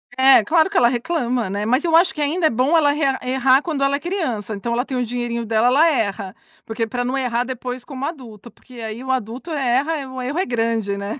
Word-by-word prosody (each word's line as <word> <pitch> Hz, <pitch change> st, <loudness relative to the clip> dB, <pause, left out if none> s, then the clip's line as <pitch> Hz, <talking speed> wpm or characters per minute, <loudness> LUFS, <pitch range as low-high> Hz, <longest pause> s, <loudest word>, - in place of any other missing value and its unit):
É, 260 Hz, -3 st, +6 dB
claro 320 Hz, -, +3 dB
que 405 Hz, -, -2 dB
ela 240 Hz, -, +5 dB
reclama, 245 Hz, -, -1 dB
né. 205 Hz, +2 st, -3 dB
Mas 255 Hz, +6 st, +1 dB
eu 330 Hz, -2 st, +2 dB
acho 345 Hz, +2 st, +4 dB
que 300 Hz, -, -5 dB
ainda 320 Hz, +4 st, 0 dB
é -, -, +2 dB
bom 255 Hz, +8 st, +2 dB
ela 290 Hz, -3 st, +4 dB
re 295 Hz, +2 st, -3 dB, 0.2 s
errar 260 Hz, +1 st, +3 dB
quando 300 Hz, -5 st, -2 dB
ela 275 Hz, 0 st, +2 dB
é 280 Hz, -, -3 dB
criança, 270 Hz, -, -3 dB
então 235 Hz, +4 st, -3 dB
ela 245 Hz, +3 st, 0 dB
tem 265 Hz, -, -5 dB
o 250 Hz, -, 0 dB
dinheirinho 235 Hz, 0 st, -3 dB
dela, 225 Hz, +1 st, +2 dB
ela 285 Hz, +7 st, +5 dB
erra. 200 Hz, -8 st, -2 dB, 0.3 s
Porque 225 Hz, 0 st, -2 dB
pra 245 Hz, +2 st, -3 dB
não 255 Hz, +2 st, -2 dB
errar 245 Hz, -2 st, 0 dB
depois 250 Hz, 0 st, -6 dB
como 270 Hz, -1 st, -6 dB
adulto, 240 Hz, -, -8 dB
porque 255 Hz, -, -19 dB
aí 225 Hz, +2 st, -6 dB
o 260 Hz, -, -2 dB
adulto 255 Hz, +6 st, -4 dB
erra, 280 Hz, +1 st, 0 dB
o 260 Hz, 0 st, -6 dB
erro 280 Hz, +7 st, -3 dB
é 375 Hz, -, +1 dB
grande, 225 Hz, -4 st, -1 dB
né. 200 Hz, +6 st, -5 dB
255 Hz, 240 wpm, -20 LUFS, 230-285 Hz, 0.3 s, É